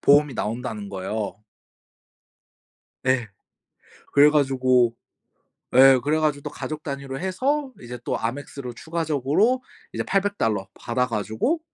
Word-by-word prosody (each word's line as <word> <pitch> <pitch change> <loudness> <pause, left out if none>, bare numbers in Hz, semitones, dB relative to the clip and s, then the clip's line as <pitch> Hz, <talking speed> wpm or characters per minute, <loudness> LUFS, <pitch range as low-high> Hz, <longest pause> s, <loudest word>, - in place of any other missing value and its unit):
보험이 145 -1 +5
나온다는 110 -2 -3
거예요. 100 +1 -4 1.6
네. 130 -4 +1 0.9
그래 145 +1 +7
가지고 130 -5 +3 0.8
예 135 0 +8
그래 150 +4 +1
가지고 150 -2 0
또 - - -4
가족 155 0 -6
단위로 140 -2 -5
해서 265 +10 0
이제 120 0 -7
또 - - -1
Amex로 130 +1 -4
추가적으로 160 - 0 0.3
이제 - - -2
800 200 +1 0
달러 105 -3 0
받아 125 +1 0
가지고 110 - -1
135 Hz, 265 characters per minute, -24 LUFS, 120-155 Hz, 1.6 s, 예